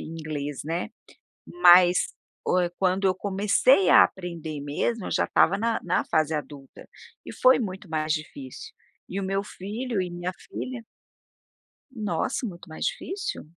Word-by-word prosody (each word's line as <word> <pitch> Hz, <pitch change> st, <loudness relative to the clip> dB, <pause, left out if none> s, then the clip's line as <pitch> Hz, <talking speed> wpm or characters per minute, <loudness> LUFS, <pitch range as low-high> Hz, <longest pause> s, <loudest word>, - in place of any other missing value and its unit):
inglês, 150 Hz, -3 st, -5 dB
né, 170 Hz, +6 st, -3 dB, 0.6 s
mas 180 Hz, -, +6 dB, 0.4 s
o 185 Hz, -, +2 dB
eh, 175 Hz, -, 0 dB
quando 190 Hz, +1 st, +2 dB
eu 185 Hz, -, +2 dB
comecei 200 Hz, +2 st, +3 dB
a -, -, +9 dB
aprender 170 Hz, -5 st, -5 dB
mesmo, 165 Hz, +10 st, -2 dB
eu -, -, -6 dB
já -, -, +2 dB
estava 195 Hz, +4 st, +3 dB
na 225 Hz, +2 st, 0 dB
na 180 Hz, 0 st, +1 dB
fase 155 Hz, 0 st, +1 dB
adulta 145 Hz, -2 st, -7 dB, 0.4 s
e -, -, -8 dB
foi 255 Hz, 0 st, +5 dB
muito 190 Hz, -3 st, -5 dB
mais 155 Hz, -1 st, -1 dB
difícil. 140 Hz, -4 st, -7 dB, 0.4 s
E 195 Hz, -, -3 dB
o -, -, -3 dB
meu 195 Hz, +1 st, -1 dB
filho 210 Hz, +3 st, -4 dB
e 180 Hz, -, -3 dB
minha 175 Hz, +1 st, -4 dB, 0.2 s
filha 250 Hz, -3 st, -6 dB, 1.1 s
Nossa, 215 Hz, 0 st, -2 dB
muito 175 Hz, -4 st, -10 dB
mais 155 Hz, -, -5 dB
difícil. 385 Hz, -, -4 dB
180 Hz, 150 wpm, -26 LUFS, 160-205 Hz, 1.1 s, a